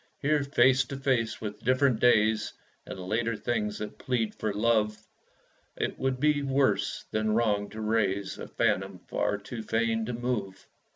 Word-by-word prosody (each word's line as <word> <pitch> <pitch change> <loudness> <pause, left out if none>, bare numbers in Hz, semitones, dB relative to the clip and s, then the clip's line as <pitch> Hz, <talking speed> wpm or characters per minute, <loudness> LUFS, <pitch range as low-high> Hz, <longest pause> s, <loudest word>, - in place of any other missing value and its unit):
Here, 150 0 +2
face 135 -1 +4
to 140 - -6
face 125 -5 0
with 105 -1 -6
different 130 -2 +3
days, 110 -3 +3 0.3
And - - -7
later 110 +5 -1
things 105 -1 -2
that 105 - -7
plead 120 -4 -1
for 110 - -2
love, 105 0 +1 0.8
It - - -2
would 130 -1 0
be 150 0 +3
worse 135 -7 +1
than 110 0 +1
wrong 105 -3 +1
to 110 +1 -7
raise 100 -3 0
A - - -6
phantom - - 0
far 105 - 0
too 110 +3 -7
fain 110 0 0
to 125 - -3
move. 115 -5 -3
115 Hz, 160 wpm, -28 LUFS, 105-130 Hz, 0.8 s, face